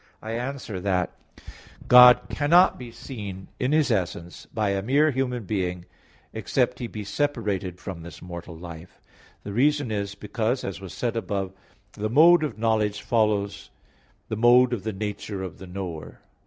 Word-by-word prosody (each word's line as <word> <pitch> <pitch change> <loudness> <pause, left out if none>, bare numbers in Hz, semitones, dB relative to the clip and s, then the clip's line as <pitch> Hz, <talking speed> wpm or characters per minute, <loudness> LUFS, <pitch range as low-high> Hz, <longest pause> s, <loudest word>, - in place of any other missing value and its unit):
I 110 - -7
answer 120 -4 -4
that, 90 -2 0 0.8
God 125 0 +9
cannot 170 +6 +4
be 120 -2 -8
seen 100 -8 -8
in 130 +2 0
His 150 -4 +3
essence 90 -4 -3
by 105 -2 -1
a 100 0 -1
mere 145 +8 +3
human 125 -3 -2
being, 90 -3 -2 0.5
except - - 0
he 120 - -3
be 110 -2 -7
separated 100 -6 -2
from 90 -4 -7
this 80 -3 -10
mortal 85 -1 -9
life. 85 0 -11 0.4
The 100 - -6
reason 145 +1 +2
is 100 -1 -3
because, 110 +5 -2
as 100 0 -5
was 95 -3 -8
said 120 -2 -2
above 100 -4 -2
(A. 95 +2 -25
4), - - -5
the 110 - +1
mode 160 +6 +6
of 150 - -3
knowledge 110 -2 0
follows 105 -3 0 0.6
the - - -3
mode 120 +2 +5
of 115 - -2
the 110 - -3
nature 105 -1 -5
of 95 - -7
the 95 - -10
knower. 90 -4 -7
105 Hz, 170 wpm, -25 LUFS, 95-125 Hz, 0.8 s, God